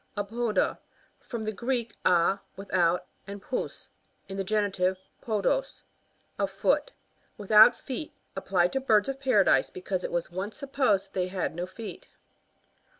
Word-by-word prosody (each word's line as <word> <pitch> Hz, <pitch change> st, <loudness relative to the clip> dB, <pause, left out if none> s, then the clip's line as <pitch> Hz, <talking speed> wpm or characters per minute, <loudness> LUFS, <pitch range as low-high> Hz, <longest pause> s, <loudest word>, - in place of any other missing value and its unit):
Apoda 220 Hz, +2 st, 0 dB, 0.2 s
— -, -, -36 dB
From 230 Hz, -3 st, -4 dB
the 215 Hz, -, -1 dB
Greek, 235 Hz, 0 st, -2 dB
a, 180 Hz, +2 st, +3 dB, 0.2 s
without, 180 Hz, -3 st, +1 dB, 0.2 s
and 200 Hz, +1 st, -6 dB
pous, 250 Hz, +5 st, -4 dB, 0.4 s
(in 195 Hz, -, -6 dB
the 195 Hz, -, -1 dB
genitive, 190 Hz, -2 st, +1 dB, 0.2 s
podos^) 225 Hz, -, -1 dB, 0.6 s
a -, -, +2 dB
foot. -, -, +1 dB, 0.5 s
Without 215 Hz, +3 st, +7 dB
feet. 275 Hz, +3 st, -6 dB, 0.2 s
Applied 185 Hz, -2 st, +1 dB
to 270 Hz, -, +1 dB
birds 220 Hz, -4 st, +3 dB
of 270 Hz, 0 st, -4 dB
Paradise, 205 Hz, -, +4 dB
because 185 Hz, 0 st, -4 dB
it -, -, -3 dB
was 175 Hz, 0 st, -2 dB
once 190 Hz, +4 st, -5 dB
supposed 255 Hz, -9 st, 0 dB
they 185 Hz, -1 st, 0 dB
had 185 Hz, -2 st, -2 dB
no 175 Hz, +2 st, -4 dB
feet. 215 Hz, +4 st, -9 dB
205 Hz, 145 wpm, -28 LUFS, 185-235 Hz, 0.6 s, Without